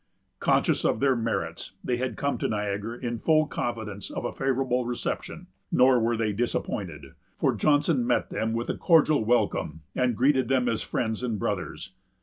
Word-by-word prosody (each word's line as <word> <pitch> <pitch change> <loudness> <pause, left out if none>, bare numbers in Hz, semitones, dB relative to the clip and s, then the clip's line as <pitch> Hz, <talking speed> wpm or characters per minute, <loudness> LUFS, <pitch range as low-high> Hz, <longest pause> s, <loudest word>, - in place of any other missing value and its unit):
Conscious - - +2
of - - +1
their 135 -1 +3
merits, 110 -9 -3
they 125 - 0
had 130 +1 -3
come 140 0 -1
to - - 0
Niagara 105 +2 -3
in 120 -2 -3
full 155 +3 +3
confidence 110 -7 -4
of - - -5
a - - -1
favorable 130 -1 0
reception. 120 0 -4 0.3
Nor 125 0 +5
were 115 0 +1
they 110 -2 0
disappointed; 90 - -3 0.2
for - - +2
Johnson 145 -4 +2
met 125 - +1
them 110 0 -1
with 115 +1 -1
a - - -4
cordial 155 -6 +4
welcome, 105 -9 0
and 125 -3 +1
greeted 130 -1 +3
them 130 -1 +2
as 115 -2 0
friends 110 -1 -2
and 120 -4 -1
brothers. 95 -1 -4
120 Hz, 170 wpm, -27 LUFS, 110-130 Hz, 0.3 s, Nor